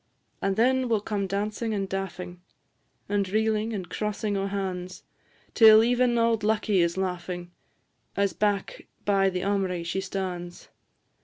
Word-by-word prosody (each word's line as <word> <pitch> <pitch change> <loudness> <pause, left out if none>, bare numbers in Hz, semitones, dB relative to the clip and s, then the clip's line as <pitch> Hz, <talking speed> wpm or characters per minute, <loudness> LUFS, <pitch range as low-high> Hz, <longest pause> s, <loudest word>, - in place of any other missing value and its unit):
And 195 0 0
then 255 +3 +2
will 225 -2 +3
come 200 -1 -2
dancing 210 +3 -2
and 195 -1 -2
daffing, 185 -2 -5 0.7
And 200 -1 0
reelin' 220 +1 +1
and 190 -5 -4
crossin' 210 -1 -2
o' 195 0 -1
han's, 185 -2 -4 0.5
Till 220 -1 +8
even 245 0 +2
auld 230 -1 +2
Lucky 215 -2 +2
is 170 +1 +1
laughing, 180 -1 -3 0.6
As 200 -3 +1
back 205 0 -1 0.2
by 195 -1 +3
the 180 -1 -3
aumry 190 -3 0
she 175 +3 -2
stan's. 185 -2 -5
200 Hz, 140 wpm, -26 LUFS, 185-215 Hz, 0.7 s, Till